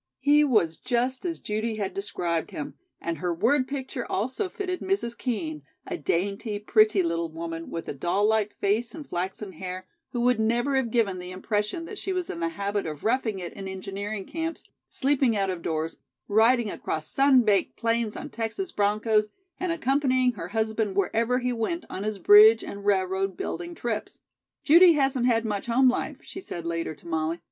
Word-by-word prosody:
He 290 Hz, +3 st, +5 dB
was 210 Hz, -, +2 dB
just 250 Hz, +4 st, -1 dB
as 335 Hz, -2 st, -2 dB
Judy 220 Hz, +1 st, -2 dB
had 205 Hz, -2 st, -3 dB
described 175 Hz, -4 st, -2 dB
him; 150 Hz, -, -6 dB, 0.3 s
and 170 Hz, -1 st, -3 dB
her 180 Hz, 0 st, -1 dB
word 250 Hz, -, +2 dB
picture 265 Hz, -3 st, -4 dB
also 260 Hz, -, -1 dB
fitted 365 Hz, -2 st, -3 dB
Mrs. 375 Hz, -12 st, -1 dB
Kean, 170 Hz, -, -3 dB, 0.2 s
a -, -, -4 dB
dainty, 200 Hz, -, -1 dB
pretty, 215 Hz, -1 st, +4 dB
little 165 Hz, 0 st, -1 dB
woman, 165 Hz, +1 st, -6 dB
with 165 Hz, -, -5 dB
a -, -, -3 dB
doll 175 Hz, +8 st, 0 dB
like 215 Hz, -1 st, +1 dB
face 215 Hz, +4 st, 0 dB
and 305 Hz, -3 st, -8 dB
flaxen 190 Hz, +3 st, -4 dB
hair, 185 Hz, +1 st, -6 dB, 0.3 s
who 240 Hz, -, -2 dB
would 245 Hz, -1 st, +3 dB
never 240 Hz, +5 st, +1 dB
have 265 Hz, -3 st, +1 dB
given 215 Hz, -6 st, +1 dB
the 180 Hz, 0 st, -7 dB
impression 210 Hz, -, -2 dB
that 425 Hz, +3 st, -8 dB
she 385 Hz, -, -3 dB
was 365 Hz, -2 st, -2 dB
in 170 Hz, -, -6 dB
the 165 Hz, 0 st, 0 dB
habit 200 Hz, +2 st, -2 dB
of 150 Hz, -2 st, -6 dB
roughing 225 Hz, -2 st, +1 dB
it 175 Hz, -2 st, -6 dB
in 195 Hz, -1 st, -7 dB
engineering 195 Hz, +2 st, -5 dB
camps, 330 Hz, 0 st, -4 dB, 0.3 s
sleeping 265 Hz, -5 st, +2 dB
out 195 Hz, -1 st, +1 dB
of 180 Hz, -2 st, -5 dB
doors, 160 Hz, -1 st, -2 dB, 0.3 s
riding 225 Hz, +1 st, +4 dB
across 155 Hz, -1 st, -3 dB
sun 270 Hz, -2 st, +5 dB
baked 205 Hz, -3 st, +1 dB
plains 230 Hz, -2 st, 0 dB
on 290 Hz, -, -7 dB
Texas 230 Hz, -, -3 dB
bronchos, 210 Hz, +1 st, +2 dB, 0.3 s
and 365 Hz, -2 st, -1 dB
accompanying 265 Hz, -5 st, +2 dB
her 180 Hz, -8 st, -7 dB
husband 220 Hz, 0 st, -1 dB
wherever 230 Hz, +5 st, +1 dB
he 250 Hz, -1 st, -1 dB
went 280 Hz, +9 st, -2 dB
on 190 Hz, -, -4 dB
his 215 Hz, -1 st, -2 dB
bridge 210 Hz, +4 st, +8 dB
and 200 Hz, 0 st, -7 dB
railroad 190 Hz, -1 st, +1 dB
building 345 Hz, -1 st, -4 dB
trips. 235 Hz, -7 st, -4 dB, 0.4 s
"Judy 340 Hz, +3 st, +8 dB
hasn't 270 Hz, -4 st, +2 dB
had 230 Hz, -2 st, +2 dB
much 210 Hz, 0 st, -3 dB
home 255 Hz, +2 st, +5 dB
life," 250 Hz, -, -2 dB
she 375 Hz, -, -8 dB
said 170 Hz, -, -7 dB
later 165 Hz, -1 st, -2 dB
to 145 Hz, -, -16 dB
Molly. 160 Hz, +1 st, -1 dB
215 Hz, 185 wpm, -26 LUFS, 190-255 Hz, 0.4 s, bridge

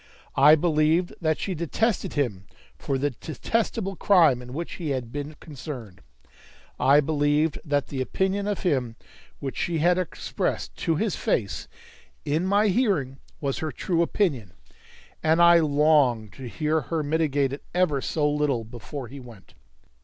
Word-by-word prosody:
I 150 Hz, +3 st, +7 dB
believed 160 Hz, +2 st, +2 dB
that 155 Hz, -2 st, +1 dB
she 195 Hz, -, -3 dB
detested 180 Hz, +7 st, -1 dB
him 105 Hz, -10 st, -2 dB, 0.3 s
for 135 Hz, -, -2 dB
the 145 Hz, +2 st, 0 dB
detestable 195 Hz, -, -2 dB
crime 165 Hz, -11 st, +4 dB
in 125 Hz, 0 st, -10 dB
which 165 Hz, +6 st, -5 dB
he 165 Hz, -4 st, -4 dB
had 130 Hz, -4 st, -3 dB
been 145 Hz, +2 st, -5 dB
concerned. 130 Hz, -, -9 dB, 0.8 s
I 140 Hz, +2 st, +5 dB
believed 150 Hz, +1 st, +1 dB
that 145 Hz, -3 st, -1 dB
the 135 Hz, -2 st, -3 dB
opinion 190 Hz, +8 st, -1 dB
of 205 Hz, -2 st, -2 dB
him 130 Hz, -10 st, 0 dB, 0.4 s
which 135 Hz, -2 st, -5 dB
she 170 Hz, -1 st, -1 dB
had 175 Hz, +3 st, +3 dB
expressed 165 Hz, -, -3 dB
to 165 Hz, -, 0 dB
his 205 Hz, +3 st, -1 dB
face, 100 Hz, -4 st, -1 dB, 0.6 s
in 160 Hz, +5 st, 0 dB
my 205 Hz, +2 st, +3 dB
hearing, 180 Hz, -, 0 dB, 0.2 s
was 140 Hz, -3 st, -2 dB
her 155 Hz, -1 st, -3 dB
true 170 Hz, -2 st, -1 dB
opinion, 145 Hz, -, 0 dB, 0.7 s
and 160 Hz, +1 st, +3 dB
I 170 Hz, 0 st, +7 dB
longed 145 Hz, -8 st, +3 dB
to 130 Hz, +4 st, -8 dB
hear 155 Hz, +4 st, 0 dB
her 155 Hz, +4 st, -2 dB
mitigate 145 Hz, -3 st, +1 dB
it 140 Hz, -, -7 dB
ever 155 Hz, -7 st, +2 dB
so 150 Hz, +1 st, 0 dB
little 145 Hz, -5 st, 0 dB
before 120 Hz, +3 st, -8 dB
he 140 Hz, +4 st, -10 dB
went. 120 Hz, -6 st, -14 dB
150 Hz, 155 wpm, -25 LUFS, 135-170 Hz, 0.8 s, I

